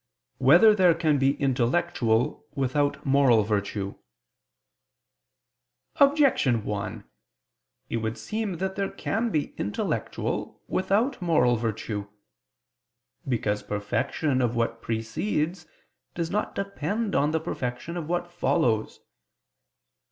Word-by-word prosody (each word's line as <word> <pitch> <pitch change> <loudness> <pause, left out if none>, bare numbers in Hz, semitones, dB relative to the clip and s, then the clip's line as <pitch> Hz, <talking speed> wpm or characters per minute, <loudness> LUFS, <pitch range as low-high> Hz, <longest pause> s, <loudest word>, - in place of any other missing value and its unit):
5] - - -16
Whether 180 +9 +8
There 180 -5 +4
Can 155 -4 +2
Be 135 +1 +3
Intellectual 130 -1 0
Without 140 +2 0
Moral 135 -5 +4
Virtue? 100 -1 -2 2.0
Objection 275 - +4
1: 105 -2 -4 0.8
It - - -2
would 110 0 -3
seem 215 -2 -3
that 190 +2 -3
there 195 -1 -1
can 230 +3 -2
be 155 -8 -1
intellectual 105 - -3
without 215 +7 0
moral 160 -8 +3
virtue. 110 -2 -3 1.2
Because 105 -5 0
perfection 130 +7 -1
of 120 -1 0
what 115 -1 -1
precedes 155 - -2 0.5
does 165 -1 -2
not 210 +1 -1
depend 200 +2 -2
on 145 +2 +3
the 160 +1 0
perfection 125 +5 -4
of 165 -3 -5
what 175 0 -2
follows. 125 -10 0
145 Hz, 105 wpm, -26 LUFS, 115-175 Hz, 2.0 s, Whether